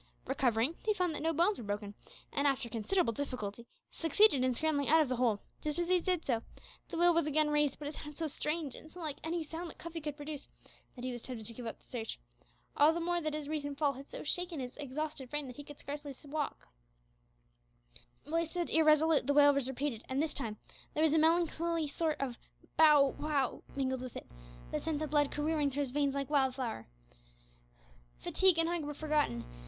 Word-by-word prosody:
Recovering, 260 +2 +1
he 430 -1 +2
found 360 -4 +1
that - - -4
no 325 +1 +2
bones 345 +6 +2
were - - -6
broken, 205 0 -3 0.4
and 285 0 +2
after 270 -3 +1
considerable 230 - +1
difficulty, 235 -4 -4 0.2
succeeded 325 -3 +4
in 255 -1 +2
scrambling 295 -1 +1
out 320 +2 +7
of 305 -5 +3
the 255 - 0
hole. 230 -4 +2 0.2
Just 300 0 -2
as 345 0 -1
he 365 0 +5
did 360 -2 0
so, 235 -4 +1 0.5
the - - -4
wail 345 +1 +5
was 335 -2 +2
again 305 0 +2
raised; 295 -2 +2
but 295 - -6
it 295 - -4
sounded 295 -1 -8
so 330 - -1
strange, 300 -1 -2
and 310 - -12
so 360 - -11
unlike 310 -4 -4
any 330 +1 -1
sound 330 +3 -6
that - - -12
Cuffy 335 -1 -6
could 295 -1 -4
produce, 290 -1 -7 0.5
that 250 -1 -6
he 255 - -1
was 240 -1 -6
tempted 230 -4 -7
to 230 - -4
give 235 0 -7
up 225 - -5
the - - -29
search 225 -3 -5 0.6
all 300 +2 +6
the 340 - -2
more 345 +1 0
that 310 -1 -2
his 300 -2 -4
recent 285 -2 -3
fall 290 -2 +2
had 275 +2 -11
so - - -7
shaken 350 +1 -1
his 250 -1 -5
exhausted 295 -1 -4
frame 295 +1 -2
that 250 -2 -9
he 290 - -7
could 290 0 -11
scarcely 285 -1 -6
walk. 295 0 -4 1.6
While 325 +3 0
he 335 - -2
stood 350 +1 -2
irresolute, 310 -2 +4
the 285 - +2
wail 290 -1 +8
was 275 -2 0
repeated, 265 -3 -3
and, 260 +1 0
this 305 0 0
time, 225 -6 -2 0.4
there 310 - +2
was 315 -2 +4
a 320 - +5
melancholy 330 0 +2
sort 310 +1 0
of 255 -4 -3 0.4
"bow 300 -3 +7
wow" 290 -4 0
mingled 260 -2 -1
with 255 -2 -7
it, - - -8 0.5
that - - -1
sent 320 -2 -1
the 310 - -1
blood 290 -1 +2
careering 295 -1 +1
through 280 +2 -2
his 275 -3 -2
veins 280 0 +1
like 280 +1 -2
wildfire. 260 - 0 1.3
Fatigue 365 - +3
and 330 0 +3
hunger 340 -3 -1
were 295 - -4
forgotten. 295 - 0
295 Hz, 215 wpm, -33 LUFS, 265-320 Hz, 1.6 s, wail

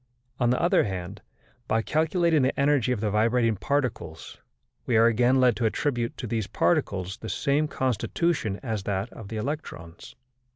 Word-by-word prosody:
On 120 -2 +2
the 125 - +2
other 175 - +3
hand, 95 0 -5 0.5
by 110 0 +1
calculating 160 +1 +2
the 130 +1 0
energy 140 -3 +2
of 120 -5 -1
the 105 -2 0
vibrating 115 +2 +2
particles 115 - -3 0.5
we 115 - +3
are 115 - +6
again 120 +3 +3
led 125 -3 +4
to 120 - 0
attribute 120 0 -2
to - - -5
these 110 -3 -2
particles 100 - 0
the 110 - -7
same 140 +9 +1
constitution 130 - -1
as 110 -5 -2
that 100 +2 -3
of 110 - -10
the 110 - -5
electrons. 105 - -6
115 Hz, 165 wpm, -26 LUFS, 105-140 Hz, 0.5 s, are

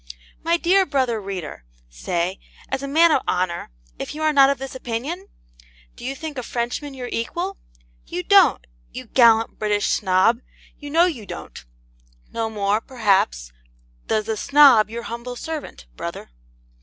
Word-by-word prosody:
My 335 +1 +2
dear 370 +3 +3
brother 255 -6 0
reader, 185 - -6 0.2
say, 170 - -3 0.3
as 270 - -2
a 275 - -4
man 325 +4 +5
of 265 - +3
honour, 180 -1 -1 0.3
if - - -5
you 310 - -4
are 310 0 +2
not 275 -1 +6
of 280 - 0
this 270 0 -7
opinion? 260 - -5 0.7
Do - - -13
you 265 +2 -3
think 300 -1 -6
a - - -3
Frenchman 245 +4 -4
your 250 -2 -6
equal? 350 +12 -3 0.5
You - - -4
don't - - +5 0.3
you - - -8
gallant 230 -3 +4
British 210 -1 0
Snob 190 +4 +3 0.4
you 290 - -8
know 330 +4 +4
you 255 - -4
don't: - - -9 0.7
no 225 -1 -2
more, 210 0 0
perhaps, 195 - 0 0.6
does 215 -1 0
the 220 -1 -2
Snob 275 -5 +6
your 235 +1 -6
humble 235 +2 -6
servant, 300 - -7
brother. - - -7
240 Hz, 155 wpm, -22 LUFS, 210-290 Hz, 0.7 s, not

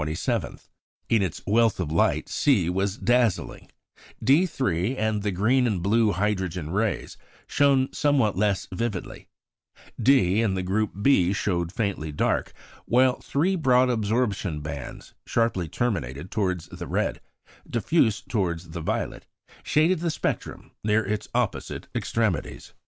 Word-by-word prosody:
In 115 -3 +3
its 95 -5 -3
wealth 115 0 +3
of 80 -5 -2
light 80 - +1
C 100 - +2
was 95 +2 -1
dazzling; 120 -5 0 0.6
D_3 130 - +2
and 110 -1 0
the 105 - -1
green 120 +7 +2
and 95 -7 -1
blue 110 +2 +3
hydrogen 95 -4 -2
rays 105 0 -1 0.3
shone 135 -2 +2
somewhat 135 -9 +2
less 100 0 0
vividly; 105 -2 -4 0.7
D 110 -7 +4
and 100 -4 0
the 95 - -2
group 100 +1 -1
b 95 -9 +4
showed 85 -4 -1
faintly 95 -7 -2
dark; 75 - 0 0.4
while 125 +1 +3
three 175 +7 0
broad 130 -6 +3
absorption 105 -7 -1
bands, 75 -3 -7
sharply 115 -7 0
terminated 85 - -3
towards 90 -5 -1
the - - -7
red, - - -1 0.5
diffuse 120 -2 +1
towards 85 -6 -2
the 85 0 -5
violet, - - -3 0.3
shaded 160 +4 +2
the 170 0 -1
spectrum 155 - -4
near 105 0 +2
its 105 +1 -3
opposite 120 -4 -2
extremities. 110 - -2
105 Hz, 130 wpm, -25 LUFS, 90-125 Hz, 0.7 s, D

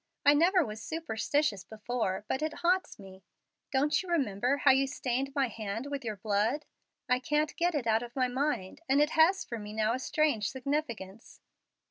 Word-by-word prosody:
I 290 - +8
never 345 +3 +4
was 215 -1 -7
superstitious 290 - -1
before, 220 -3 -3
but 265 - -1
it 310 0 -1
haunts 365 +2 +1
me. 190 -1 -13 0.5
Don't 290 +2 +2
you 375 - -10
remember 260 - +1
how 285 - +5
you 270 +1 +3
stained 270 -1 -2
my 275 -2 +2
hand 220 +1 -5
with 280 -1 -3
your 220 -2 -3
blood? 215 +8 0 0.4
I 250 0 +2
can't 295 +3 0
get 345 -1 +1
it 275 -5 -1
out 225 0 +2
of 240 0 -9
my 255 -2 +2
mind, 260 -4 -2
and 275 +2 +4
it 295 +1 +3
has 335 +5 +4
for 235 - -5
me 210 0 -8
now 220 +1 +1
a 255 - -2
strange 265 -7 +1
significance. 240 -7 -4
260 Hz, 185 wpm, -30 LUFS, 220-295 Hz, 0.5 s, I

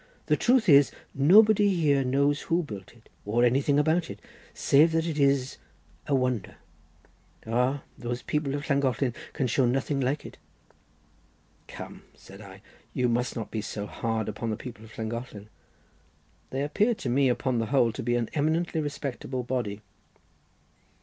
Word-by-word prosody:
The - - +3
truth 245 -3 +2
is, 140 -3 +7 0.2
nobody 205 +8 +6
here 145 -5 +2
knows 140 +3 +1
who 170 +1 0
built 100 -9 -9
it, 115 -1 -22 0.2
or 115 +4 +1
anything 135 +4 +2
about 160 +3 +2
it, - - -8 0.3
save 155 +3 +3
that 165 0 +1
it 160 -3 -3
is 140 -2 +2 0.5
a 140 - +2
wonder. 125 -6 -1 0.9
Ah, 125 +5 0 0.2
those 120 0 -4
people 150 -2 -1
of 145 0 -5
Llangollen 135 -3 +1 0.2
can 135 - -1
show 125 +1 +2
nothing 135 +3 0
like 135 +3 -1
it." - - -11 1.3
"Come," - - -9
said 95 +2 -14
I, 100 0 -13 0.3
"you 125 -1 +2
must 120 +1 -1
not 115 - -5
be 110 - -2
so 105 0 -5
hard 110 0 -3
upon 115 - -4
the 110 - -2
people 115 -2 -9
of 110 -1 -14
Llangollen. 110 -2 -6 1.0
They 135 +1 -2
appear 210 +11 +1
to 140 - -6
me, 130 +2 +3
upon 125 0 0
the 115 - -1
whole, 125 -3 +3
to 110 - -6
be 120 0 0
an 120 -2 0
eminently 160 +2 0
respectable 135 -3 -4
body." 120 -5 -3
130 Hz, 160 wpm, -27 LUFS, 115-145 Hz, 1.3 s, is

